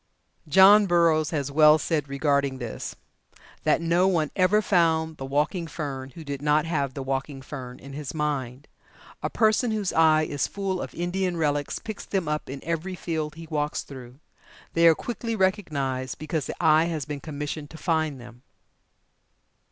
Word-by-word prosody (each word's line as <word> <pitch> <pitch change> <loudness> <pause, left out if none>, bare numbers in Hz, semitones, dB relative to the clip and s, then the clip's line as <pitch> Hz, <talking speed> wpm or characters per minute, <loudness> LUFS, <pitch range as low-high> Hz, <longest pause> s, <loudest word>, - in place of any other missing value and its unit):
'" - - -46
John 195 +6 +7
Burroughs 165 -3 +3
has 145 -3 -2
well 150 +1 +7
said 150 -3 -1
regarding 140 -1 +1
this 120 -3 -6 0.7
that - - +3
"No 170 +3 +3
one 165 -6 +1
ever 190 +3 +4
found 160 -5 +2
the 135 - -6
walking 150 +5 0
fern 140 -4 -5
who 165 - -8
did 140 -2 -5
not 150 +1 +2
have 140 -5 -1
the 135 - -4
walking 135 +1 -3
fern 130 -3 -8
in 140 +1 -11
his 145 -1 -5
mind. 140 -4 -3 0.5
A - - -1
person 220 +2 +2
whose 210 -4 -1
eye 155 -1 +5
is 145 -3 -1
full 195 -2 -3
of - - -7
Indian 175 +1 -1
relics 145 -2 0
picks 220 -2 -7
them 190 -5 -2
up 150 -2 -2
in 135 +1 -7
every 170 +3 -3
field 155 -3 -3
he 165 +1 -9
walks 150 -1 -1
through. 130 -2 -11 0.6
They 165 0 +5
are 165 - +7
quickly 230 +2 -4
recognized 145 - -1
because 155 -1 -3
the - - -5
eye 160 -1 +5
has 160 -5 -3
been 145 0 -5
commissioned 145 0 -5
to 160 - -11
find 155 -5 -1
them." 120 0 -13
155 Hz, 175 wpm, -25 LUFS, 140-170 Hz, 0.7 s, John